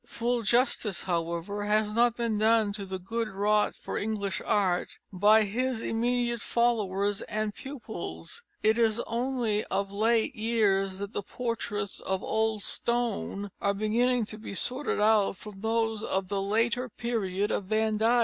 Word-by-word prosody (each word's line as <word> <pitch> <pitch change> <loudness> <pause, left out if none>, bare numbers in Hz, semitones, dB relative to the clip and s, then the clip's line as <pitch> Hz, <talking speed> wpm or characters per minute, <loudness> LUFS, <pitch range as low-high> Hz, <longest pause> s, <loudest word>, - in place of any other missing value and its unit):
Full 240 +1 -1
justice, 235 -3 +1
however, 170 +3 -2
has 210 0 +2
not 235 +1 +3
been 230 -3 0
done 220 -1 +3
to 200 -1 -5
the 190 0 -3
good 225 +5 -3
wrought 210 +1 +1
for - - -4
English 205 -2 -2
art 185 -4 +1 0.2
by 210 +4 +5
his 245 +4 -1
immediate 235 0 0
followers 205 -5 +1
and 215 0 -1
pupils. 215 - -7 0.2
It 220 +2 +3
is 225 -1 +3
only 235 -3 -1
of 195 0 -2
late 220 +2 +2
years 205 -4 +1
that 200 +2 -6
the - - -1
portraits 205 -3 -3
of 190 0 -2
old 220 -2 0
Stone 230 -4 -1
are 200 0 +1
beginning 235 +3 +2
to 215 +1 -8
be 215 - -7
sorted 255 +6 0
out 210 -2 +3
from 200 -1 -10
those 225 -1 0
of 190 -3 -1
the 200 -1 -1
later 230 +5 +1
period 205 -4 -1
of 200 - -1
Van 215 +1 +1
Dyck. 230 +3 +4
215 Hz, 155 wpm, -28 LUFS, 200-230 Hz, 0.2 s, by